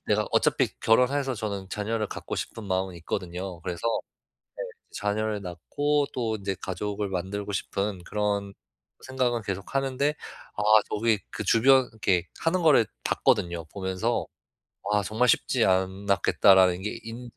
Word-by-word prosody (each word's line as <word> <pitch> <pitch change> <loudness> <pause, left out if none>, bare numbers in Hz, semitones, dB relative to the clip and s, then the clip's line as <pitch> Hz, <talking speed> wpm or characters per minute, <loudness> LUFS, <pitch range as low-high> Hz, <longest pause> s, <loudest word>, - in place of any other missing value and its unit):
내가' - - +2
어차피 - - +3
결혼해서 130 +4 +3
저는 100 -3 -4
자녀를 105 +1 -1
갖고 - - -5
싶은 110 - -5
마음은 95 -1 -1
있거든요. 90 +2 -5
그래서 85 -2 -5 0.9
네. - - -12 0.2
자녀를 105 +1 -1
낳고 145 - -1
또 115 -3 -1
인제 100 -1 -3
가족을 100 +2 -3
만들고 95 +3 -3
싶은 100 -1 -2
그런 100 -1 -1 0.5
생각은 125 -3 -1
계속 95 +2 -5
하는데. 135 +2 +1 0.4
아. - - 0 0.3
저기 110 0 +2
그 - - -4
주변 130 +2 +5
이렇게 95 -5 0
하는 175 +2 +1
거를 145 -8 +6 0.2
봤거든요. 85 -2 +1
보면서 95 +4 -1 0.7
'아. 105 - +3
정말 110 +5 +1
쉽지 - - +3
않았겠다.' 95 +1 +3
라는 90 -1 +4
게 105 - -4
인지 120 +1 -8
105 Hz, 310 characters per minute, -27 LUFS, 95-115 Hz, 0.9 s, 거를